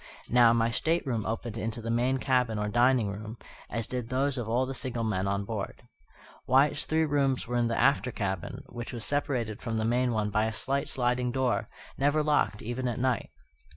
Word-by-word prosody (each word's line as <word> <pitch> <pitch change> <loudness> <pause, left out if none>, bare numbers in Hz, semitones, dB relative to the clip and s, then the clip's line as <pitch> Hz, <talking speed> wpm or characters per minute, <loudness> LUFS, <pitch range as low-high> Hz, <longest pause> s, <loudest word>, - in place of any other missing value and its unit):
Now, 120 -1 +6
my 115 0 +2
stateroom 130 -5 0
opened 115 0 -3
into 115 +1 -3
the 115 0 -3
main 125 +3 +2
cabin 125 -4 +1
or 105 0 -1
dining 120 -2 +3
room, 110 +3 -7 0.3
as 115 -1 -2
did 125 -2 -4
those 135 +2 +1
of 120 -4 -4
all 125 +3 +2
the 135 - -4
single 120 -2 -3
men 100 -3 0
on 100 0 -1
board. 110 +2 -5 0.6
Wyatt's 135 +3 +3
three 160 0 +2
rooms 140 -3 +1
were 120 - -3
in 120 -1 +2
the 115 - -1
after 140 -2 +3
cabin, 95 -5 -3
which 120 +1 -7
was 115 -3 -4
separated 125 -7 -1
from 115 -3 -2
the 110 - 0
main 125 +2 +2
one 105 -2 0
by 110 0 +2
a 110 - -2
slight 140 +4 -1
sliding 125 -1 0
door, 130 -1 0 0.3
never 145 +2 +3
locked 145 -8 +1
even 120 +3 -2
at 120 - -2
night. 130 -1 0
120 Hz, 200 wpm, -29 LUFS, 110-130 Hz, 0.6 s, Now